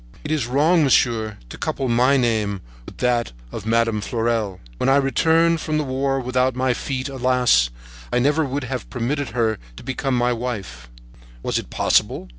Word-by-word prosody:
"It 150 Hz, -, -4 dB
is 145 Hz, -7 st, 0 dB
wrong, 155 Hz, +6 st, +3 dB
monsieur, 115 Hz, -6 st, +2 dB
to -, -, -10 dB
couple 135 Hz, -, -2 dB
my 125 Hz, +4 st, +3 dB
name 110 Hz, -5 st, 0 dB, 0.3 s
with -, -, -11 dB
that 120 Hz, -, 0 dB, 0.2 s
of 110 Hz, -, -6 dB
Madame 115 Hz, -1 st, +2 dB
de 100 Hz, -, -5 dB
Fleurel. 115 Hz, -5 st, -1 dB, 0.2 s
When 130 Hz, -, +1 dB
I 135 Hz, -, +5 dB
returned 160 Hz, +4 st, +3 dB
from 155 Hz, -1 st, -1 dB
the 155 Hz, -, 0 dB
war 135 Hz, 0 st, -1 dB
without 130 Hz, 0 st, 0 dB
my 130 Hz, 0 st, +1 dB
feet, 130 Hz, +1 st, -3 dB
alas! 125 Hz, -, +3 dB, 0.4 s
I -, -, +1 dB
never 145 Hz, +5 st, +2 dB
would 140 Hz, 0 st, -3 dB
have 125 Hz, 0 st, -5 dB
permitted 135 Hz, +3 st, -2 dB
her 110 Hz, -3 st, +1 dB, 0.2 s
to -, -, -11 dB
become 130 Hz, 0 st, -1 dB
my 120 Hz, 0 st, +2 dB
wife. 100 Hz, -, -5 dB, 0.5 s
Was -, -, 0 dB
it -, -, -9 dB
possible? 60 Hz, -, +1 dB
125 Hz, 180 wpm, -22 LUFS, 115-135 Hz, 0.5 s, I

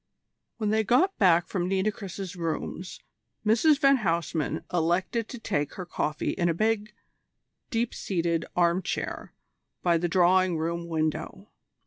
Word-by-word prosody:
When 215 Hz, -2 st, 0 dB
they 220 Hz, 0 st, +2 dB
got 295 Hz, -, +3 dB
back 175 Hz, -4 st, +5 dB
from 180 Hz, -2 st, -2 dB
Nitocris's 195 Hz, -1 st, -2 dB
rooms 175 Hz, +1 st, -4 dB, 0.4 s
Mrs 240 Hz, +8 st, +4 dB
van 275 Hz, -2 st, +5 dB
Huysman 170 Hz, -, -1 dB
elected 180 Hz, +7 st, 0 dB
to 245 Hz, -, -7 dB
take 165 Hz, -10 st, -2 dB
her 185 Hz, -, -5 dB
coffee 150 Hz, -3 st, -2 dB
in 175 Hz, -1 st, 0 dB
a 165 Hz, -, 0 dB
big, 215 Hz, +1 st, 0 dB, 0.7 s
deep 230 Hz, 0 st, -1 dB
seated 170 Hz, -3 st, -1 dB
armchair 175 Hz, +1 st, -1 dB, 0.5 s
by 170 Hz, -2 st, +3 dB
the 175 Hz, +1 st, -1 dB
drawing 185 Hz, 0 st, +3 dB
room 170 Hz, +2 st, -2 dB
window. 165 Hz, +5 st, -3 dB
185 Hz, 130 wpm, -27 LUFS, 170-215 Hz, 0.7 s, back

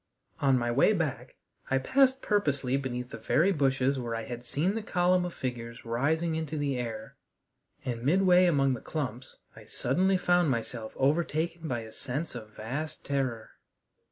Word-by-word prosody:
On 135 Hz, -2 st, +4 dB
my 120 Hz, -1 st, 0 dB
way 140 Hz, -, +4 dB
back 140 Hz, -, -3 dB, 0.3 s
I 135 Hz, -, +3 dB
passed 265 Hz, -, +3 dB
purposely 140 Hz, -10 st, +1 dB
beneath 125 Hz, -2 st, -3 dB
the -, -, -7 dB
very 175 Hz, +6 st, +3 dB
bushes 135 Hz, -4 st, +1 dB
where 120 Hz, -2 st, -3 dB
I 115 Hz, -, -3 dB
had 120 Hz, +1 st, -6 dB
seen 155 Hz, +10 st, 0 dB
the 225 Hz, -, -2 dB
column 180 Hz, -2 st, +2 dB
of 175 Hz, -, -5 dB
figures 120 Hz, -2 st, -5 dB
rising 155 Hz, +8 st, 0 dB
into 160 Hz, -1 st, -3 dB
the 145 Hz, -2 st, 0 dB
air, 115 Hz, -3 st, -6 dB, 0.7 s
and 120 Hz, -2 st, -3 dB
midway 180 Hz, +4 st, +5 dB
among 135 Hz, -5 st, +3 dB
the 125 Hz, -, -5 dB
clumps 130 Hz, -5 st, -5 dB, 0.2 s
I -, -, -13 dB
suddenly 185 Hz, +9 st, +1 dB
found 175 Hz, -2 st, +3 dB
myself 115 Hz, -2 st, -3 dB
overtaken 160 Hz, +3 st, 0 dB
by 120 Hz, -5 st, -2 dB
a 110 Hz, -1 st, -10 dB
sense 140 Hz, +8 st, -3 dB
of 110 Hz, -3 st, -8 dB
vast 125 Hz, +9 st, -5 dB
terror. 130 Hz, -5 st, -2 dB
135 Hz, 165 wpm, -29 LUFS, 120-170 Hz, 0.7 s, midway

